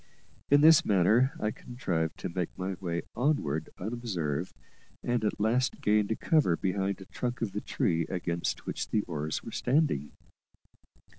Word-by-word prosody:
In 145 Hz, +1 st, +6 dB
this 160 Hz, 0 st, +8 dB
manner 105 Hz, +7 st, +4 dB
I 105 Hz, -, 0 dB
contrived 85 Hz, -11 st, -3 dB
to -, -, -3 dB
make 85 Hz, 0 st, -2 dB
my 95 Hz, +1 st, -2 dB
way 85 Hz, -3 st, -2 dB
onward 95 Hz, -, 0 dB
unobserved, 95 Hz, -8 st, -3 dB, 0.5 s
and 120 Hz, -2 st, 0 dB
at 105 Hz, -, -1 dB
last 120 Hz, +5 st, +1 dB
gained 105 Hz, -1 st, +2 dB
a 110 Hz, -, +1 dB
cover 150 Hz, -, +2 dB
behind 95 Hz, 0 st, -1 dB
the 95 Hz, -, -11 dB
trunk 120 Hz, +4 st, -4 dB
of 105 Hz, -, -2 dB
the 105 Hz, +2 st, -3 dB
tree 85 Hz, -2 st, 0 dB
against 85 Hz, -2 st, -2 dB
which -, -, -3 dB
the 105 Hz, -, +1 dB
oars 75 Hz, -2 st, -3 dB
were 115 Hz, -, -7 dB
standing. 125 Hz, -, +1 dB
100 Hz, 155 wpm, -29 LUFS, 85-120 Hz, 0.5 s, this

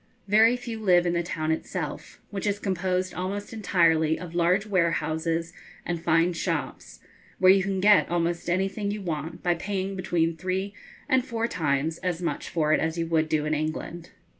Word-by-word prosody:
Very 220 Hz, +4 st, +5 dB
few 235 Hz, -2 st, -6 dB
live 180 Hz, -4 st, +4 dB
in 175 Hz, -, +1 dB
the 170 Hz, -, +1 dB
town 160 Hz, -2 st, -2 dB
itself, 160 Hz, -, -4 dB
which 205 Hz, 0 st, -3 dB
is 205 Hz, 0 st, +1 dB
composed 185 Hz, -2 st, -1 dB
almost 200 Hz, +4 st, -4 dB
entirely 165 Hz, -7 st, +2 dB
of 175 Hz, -2 st, -8 dB
large 175 Hz, +4 st, +2 dB
warehouses 165 Hz, -3 st, 0 dB, 0.3 s
and 170 Hz, -2 st, -3 dB
fine 165 Hz, +1 st, +2 dB
shops, 165 Hz, -, -4 dB, 0.4 s
where 185 Hz, 0 st, +6 dB
you 195 Hz, 0 st, +5 dB
can 195 Hz, 0 st, -1 dB
get 205 Hz, +1 st, +5 dB
almost 170 Hz, 0 st, -1 dB
anything 195 Hz, +3 st, 0 dB
you 205 Hz, 0 st, -4 dB
want 165 Hz, -1 st, -4 dB
by 175 Hz, -, +3 dB
paying 195 Hz, +2 st, -3 dB
between 170 Hz, -3 st, 0 dB
three 185 Hz, +4 st, -3 dB, 0.3 s
and 260 Hz, -3 st, +3 dB
four 230 Hz, -2 st, -2 dB
times 155 Hz, -3 st, -1 dB
as 180 Hz, -2 st, -2 dB
much 175 Hz, -, -3 dB
for 155 Hz, -2 st, +1 dB
it -, -, +3 dB
as 160 Hz, +1 st, -1 dB
you 165 Hz, -, 0 dB
would 160 Hz, -1 st, +1 dB
do 150 Hz, -1 st, +1 dB
in 155 Hz, -, 0 dB
England. 155 Hz, +2 st, -4 dB
175 Hz, 180 wpm, -26 LUFS, 165-195 Hz, 0.4 s, where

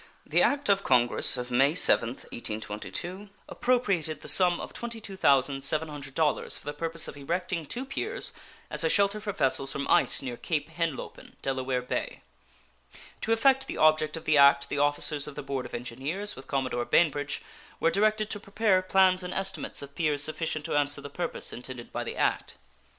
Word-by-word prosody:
The -, -, +2 dB
act 285 Hz, 0 st, +1 dB
of 195 Hz, -1 st, +3 dB
Congress 125 Hz, 0 st, +5 dB
of 125 Hz, 0 st, -5 dB
May 135 Hz, +4 st, +3 dB
7th, 125 Hz, -7 st, +4 dB
1822, 115 Hz, -, -5 dB, 0.2 s
appropriated 200 Hz, -11 st, 0 dB
the -, -, -10 dB
sum 180 Hz, -2 st, +4 dB
of -, -, -7 dB
$22,700 150 Hz, -, 0 dB
for -, -, -14 dB
the 145 Hz, -, -4 dB
purpose 165 Hz, +2 st, -3 dB
of -, -, -8 dB
erecting 170 Hz, +3 st, -3 dB
two 255 Hz, -, -5 dB
piers 430 Hz, -, -4 dB, 0.4 s
as 150 Hz, +1 st, +2 dB
a 160 Hz, -, +2 dB
shelter 200 Hz, +2 st, +2 dB
for 210 Hz, -1 st, -3 dB
vessels 135 Hz, -4 st, +1 dB
from 140 Hz, 0 st, -4 dB
ice -, -, +3 dB
near 125 Hz, -2 st, -5 dB
Cape 155 Hz, -2 st, -3 dB
Henlopen, 165 Hz, -4 st, -5 dB
Delaware 130 Hz, -1 st, -2 dB
Bay. 125 Hz, -, -4 dB, 1.0 s
To 225 Hz, -, -2 dB
effect 265 Hz, +4 st, +3 dB
the -, -, -5 dB
object 155 Hz, 0 st, +3 dB
of 160 Hz, -, -10 dB
the 155 Hz, -2 st, +3 dB
act 140 Hz, 0 st, +5 dB
the 145 Hz, -, -2 dB
officers 145 Hz, 0 st, +1 dB
of 150 Hz, -, -9 dB
the 145 Hz, -, -6 dB
Board 135 Hz, -2 st, -4 dB
of -, -, -8 dB
Engineers, 135 Hz, -, -4 dB
with 135 Hz, -, -12 dB
Commodore 130 Hz, -3 st, -2 dB
Bainbridge, 145 Hz, -4 st, +1 dB, 0.4 s
were 165 Hz, -, +2 dB
directed 215 Hz, +2 st, +1 dB
to 205 Hz, -, -2 dB
prepare 200 Hz, -2 st, +1 dB
plans 185 Hz, 0 st, +3 dB
and 180 Hz, 0 st, -6 dB
estimates 195 Hz, -6 st, -1 dB
of 140 Hz, 0 st, -11 dB
piers 150 Hz, -2 st, 0 dB
sufficient 155 Hz, 0 st, -2 dB
to 165 Hz, -, -2 dB
answer 145 Hz, -1 st, +1 dB
the 140 Hz, 0 st, -9 dB
purpose 175 Hz, +2 st, -3 dB
intended 125 Hz, 0 st, -8 dB
by -, -, -3 dB
the -, -, -6 dB
act. -, -, -1 dB
155 Hz, 175 wpm, -27 LUFS, 135-190 Hz, 1.0 s, Congress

